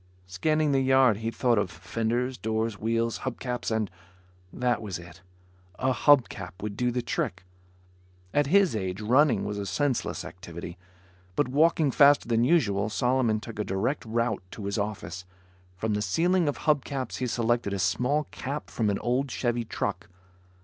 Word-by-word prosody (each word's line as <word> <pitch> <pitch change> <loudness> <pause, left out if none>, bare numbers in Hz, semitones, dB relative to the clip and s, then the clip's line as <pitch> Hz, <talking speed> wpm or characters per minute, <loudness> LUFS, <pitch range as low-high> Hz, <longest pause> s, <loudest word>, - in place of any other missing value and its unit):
Scanning 150 - +1
the 135 -1 +3
yard 130 -4 +4
he 115 +1 -2
thought 120 -1 +2
of 100 -3 -1
fenders, 115 +9 -2
doors, 110 -1 -2
wheels, 115 +1 0
hub 130 -2 -5
caps 125 -2 -3
and... 110 -2 0 0.6
that 125 -2 0
was 100 -5 -4
it. 85 +2 -13 0.6
A 130 0 +1
hub 140 -1 +5
cap 90 -2 -8
would 105 -1 -4
do 125 +3 +1
the 120 0 -2
trick. 90 -5 -2 0.9
At 145 -1 +2
his 190 - +4
age, 95 -2 -3
running 120 0 +3
was 105 0 -3
a 100 - -3
senseless 125 +7 -1
activity, 85 -1 -9 0.6
but 145 - +1
walking 155 +1 +3
faster 145 0 +5
than 115 -1 +2
usual, 110 - +2
Solomon 125 -1 +1
took 115 0 -9
a - - +1
direct 100 +10 -1
route 115 -1 -1
to 105 - -8
his 100 +1 -1
office. 90 -4 -4 0.5
From 110 +3 -1
the 105 - 0
ceiling 170 - +2
of 145 - -1
hub 150 -3 +2
caps, 130 -4 -4
he 125 - -1
selected 120 -2 0
a 100 - -1
small 130 +10 +1
cap 140 +3 -5
from 110 -3 0
an 100 - 0
old 130 +3 0
Chevy 120 -2 -1
truck. 100 -4 -3
115 Hz, 170 wpm, -27 LUFS, 105-130 Hz, 0.9 s, hub